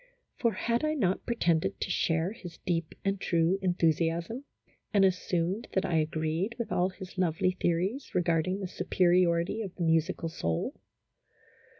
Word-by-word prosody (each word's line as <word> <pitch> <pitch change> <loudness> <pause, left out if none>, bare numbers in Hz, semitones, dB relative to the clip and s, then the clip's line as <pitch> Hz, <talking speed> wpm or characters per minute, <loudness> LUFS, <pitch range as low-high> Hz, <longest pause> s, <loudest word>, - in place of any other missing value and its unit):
For, 235 -3 +1
had 235 +3 0
I 310 0 +1
not 195 -9 0
pretended 170 -9 +1
to - - -2
share 165 +3 +1
his 180 -7 -10
deep 165 -3 -1
and 195 -1 0
true 170 +3 +2
enthusiasm, 170 - 0 0.5
and 200 -2 +5
assumed 180 +2 0
that 190 - +1
I 165 - +1
agreed 160 +7 -1
with 235 - -4
all 180 +1 +2
his 185 0 -9
lovely 185 +1 +2
theories 185 +8 -1
regarding 180 +2 +1
the 190 - -2
superiority 180 +1 +2
of 195 -4 -6
the 175 - -3
musical 165 0 +1
soul 85 - -2
180 Hz, 150 wpm, -30 LUFS, 165-195 Hz, 0.5 s, and